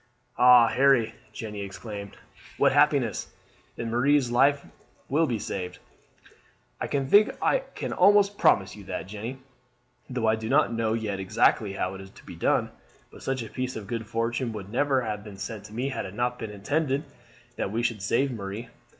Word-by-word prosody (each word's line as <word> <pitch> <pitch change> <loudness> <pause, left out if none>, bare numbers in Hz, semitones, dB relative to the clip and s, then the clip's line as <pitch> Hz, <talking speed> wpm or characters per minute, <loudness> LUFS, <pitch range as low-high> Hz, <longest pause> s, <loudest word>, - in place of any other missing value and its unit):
"Oh, 125 -1 +8
Harry," 120 -2 +3 0.2
Jeanne 110 -2 -7
exclaimed, 100 0 -7 0.4
"what - - +4
happiness! - - +2 0.4
Then 115 -1 -4
Marie's 130 +1 +3
life 140 +3 +3 0.4
will 155 +4 +2
be 120 - -1
saved." 90 -3 -5 1.0
"I - - -2
think 140 +10 +3
I - - +2 0.2
can - - -4
almost 205 +1 +5
promise 95 0 +3
you 105 - -11
that, - - -4
Jeanne, 115 +7 -7 0.7
though 125 -3 -2
I 110 0 +3
do 110 0 -5
not 140 -3 +3
know 115 -1 0
yet 110 -4 -2
exactly 100 +1 +2
how 95 -1 -2
it's 95 0 -9
to - - -18
be - - -9
done. - - +1 0.4
But - - -14
such 130 -2 -2
a - - -7
piece 130 0 -3
of 110 - -6
good 115 0 -4
fortune 115 +1 -1
would 100 -2 -7
never 135 +1 +2
have 105 -2 -4
been 105 -2 -10
sent 100 +1 -6
to 105 - -12
me 125 +4 -2
had 130 - -4
it 95 - -10
not 125 +1 -1
been 110 - -5
intended 135 +7 -1 0.5
that 95 - -2
we 115 +2 -1
should 115 -4 -1
save 130 +8 +1
Marie. 105 0 -6
115 Hz, 180 wpm, -27 LUFS, 105-130 Hz, 1.0 s, Oh